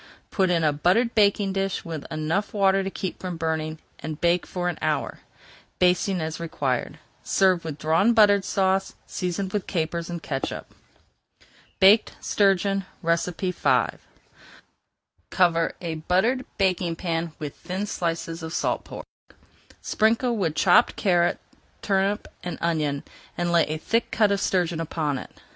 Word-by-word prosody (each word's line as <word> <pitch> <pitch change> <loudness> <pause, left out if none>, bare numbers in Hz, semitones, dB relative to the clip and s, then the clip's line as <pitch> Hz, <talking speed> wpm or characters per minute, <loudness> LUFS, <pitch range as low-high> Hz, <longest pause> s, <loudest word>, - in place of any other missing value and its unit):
Put 190 -2 +2
in 170 -2 +2
a 150 -1 +3
buttered 190 +11 +2
baking 200 -2 +3
pan 195 0 0
with 160 -3 -7
enough 160 +8 -2
water 195 -1 +3
to 195 - -2
keep 190 -1 -5
from 180 -2 -5
burning, 160 -1 -2 0.2
and 155 -1 -6
bake 175 0 +2
for 180 -1 -3
an 175 - -3
hour, - - -1 0.6
basting 180 +1 +2
as 160 +1 -4
required. 140 -6 -2 0.2
Serve 185 -3 +2
with 155 -3 -5
Drawn 160 +9 +3
Butter 205 -2 +6
Sauce, 190 0 0
seasoned 185 +1 -3
with 205 -2 -2
capers 170 -1 -2
and 170 -1 -5
catsup. 135 -2 -4 1.1
BAKED 205 +3 +6
STURGEON 195 -1 +2 0.2
V 175 +2 0 1.8
Cover 170 -3 +2
a 170 -2 -4
buttered 190 +11 +1
baking 185 -3 +1
pan 165 -2 -2
with 150 -2 -6
thin 190 +3 -4
slices 165 -3 -3
of 160 0 -6
salt - - 0
pork. - - -9 0.8
Sprinkle 230 +3 +2
with 170 -8 -1
chopped 175 -2 +4
carrot, 175 -3 +2 0.5
turnip, 195 +1 0 0.2
and 175 - -4
onion, 150 -4 -1 0.3
and 175 0 0
lay 170 -1 +4
a 155 - -2
thick 230 +9 0
cut 210 -2 +2
of 200 -1 0
sturgeon 175 -3 0
upon 150 -4 -2
it. - - -9
175 Hz, 145 wpm, -25 LUFS, 165-195 Hz, 1.8 s, Butter